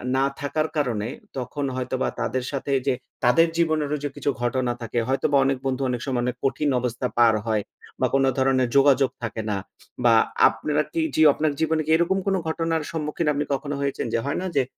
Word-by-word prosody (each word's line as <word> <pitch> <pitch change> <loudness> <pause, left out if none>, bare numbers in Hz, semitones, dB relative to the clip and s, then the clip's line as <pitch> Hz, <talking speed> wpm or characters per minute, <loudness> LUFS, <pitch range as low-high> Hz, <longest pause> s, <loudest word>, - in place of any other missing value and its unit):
না 135 +1 +3
থাকার 155 +2 -1
কারণে 115 -7 0 0.3
তখন 135 +3 -3
হয়তোবা 130 0 -2
তাদের 130 -1 -1
সাথে 140 0 -3 0.2
যে - - +4 0.3
তাদের 165 +8 +5
জীবনেরও 155 -3 +1
যে 145 - -1
কিছু - - -2
ঘটনা 120 0 0
থাকে। 115 +1 -2
হয়তোবা 140 +2 +2
অনেক 135 -1 +1
বন্ধু 135 0 -1
অনেক 120 -1 -2
সময় 130 -3 -1
অনেক 125 0 -1
কঠিন 145 +2 +1
অবস্থা 125 +1 -2
পার 115 -2 +6
হয় 110 -2 0 0.4
বা - - +3
কোন 135 0 +3
ধরনের 130 -1 +2
যোগাযোগ 135 -1 +5
থাকে 110 -1 -3
না। 100 - 0 0.5
বা 115 -1 +6 0.4
আপনারা 150 0 -1
কি 330 - 0
যিও 155 -1 +6
আপনার 155 -1 0
জীবনে 160 0 +1
কি - - -7
এরকম 170 +3 +1
কোন 195 - +2
ঘটনার 165 -1 -1
সম্মুখীন 155 0 -2
আপনি 145 +1 -1
কখনো 145 +1 -3
হয়েছেন? 140 -2 -2
যে, 115 - +2
হয়না? 180 +6 -2
যে 135 - +4
135 Hz, 190 wpm, -24 LUFS, 125-150 Hz, 0.5 s, পার